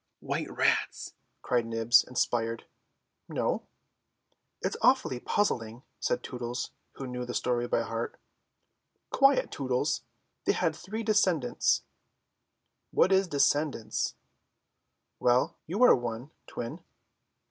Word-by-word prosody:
"White - - -3
rats," - - 0 0.3
cried 120 -2 +1
Nibs, 115 +1 +4
inspired. 115 -2 -1 0.6
"No." - - -1 1.0
"It's - - -1
awfully 125 - +3
puzzling," 120 - -1 0.2
said - - -1
Tootles, 125 0 -4 0.2
who 135 - -7
knew 125 -1 -4
the 125 0 -5
story 120 -1 0
by 115 - +1
heart. 115 +1 -4 0.9
"Quiet, 275 0 +4
Tootles. 130 -3 0 0.4
They - - +3
had 160 -2 0
three 215 +7 -5
descendants." 185 - +2 1.1
"What 190 - +3
is 190 0 +4
descendants?" 145 -5 +1 1.0
"Well, 125 +7 +3
you 200 +10 +1
are 250 - +8
one, 120 +3 -5 0.2
Twin." 120 0 -6
125 Hz, 105 wpm, -29 LUFS, 120-160 Hz, 1.1 s, are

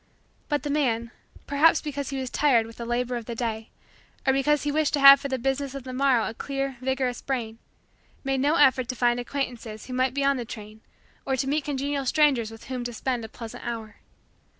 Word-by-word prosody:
But 295 -3 0
the 290 - -2
man, 235 -6 0 0.3
perhaps 290 +3 +4
because 285 -2 -4
he 275 - -4
was 260 -2 -4
tired 255 -7 +3
with 225 0 -12
the 235 - -6
labor 245 +1 -1
of 235 - -7
the 235 - -5
day 225 -1 -3 0.6
or 265 - +4
because 295 +2 +2
he 295 - 0
wished 305 0 +1
to - - -1
have 275 0 +10
for - - -3
the 265 -1 -1
business 270 +2 -2
of 275 - -6
the 255 0 -7
morrow 260 -3 +2
a - - -5
clear, 275 +1 -3
vigorous, 260 -1 -1
brain, 230 -4 -3 0.6
made 270 -1 0
no 290 +4 +2
effort 260 -5 +4
to 255 - -3
find 240 0 +2
acquaintances 245 -4 -4
who 255 - -7
might 255 +1 +1
be 280 - 0
on 275 0 +3
the 245 - -3
train 215 -1 -10 0.4
or 270 - 0
to 260 - -1
meet 295 +1 0
congenial 280 -1 -2
strangers 270 -6 +3
with 225 0 -12
whom 255 -2 -4
to 240 - -4
spend 245 0 -2
a 220 - -7
pleasant 230 0 -9
hour. 225 -3 -5
260 Hz, 220 wpm, -26 LUFS, 235-280 Hz, 0.6 s, have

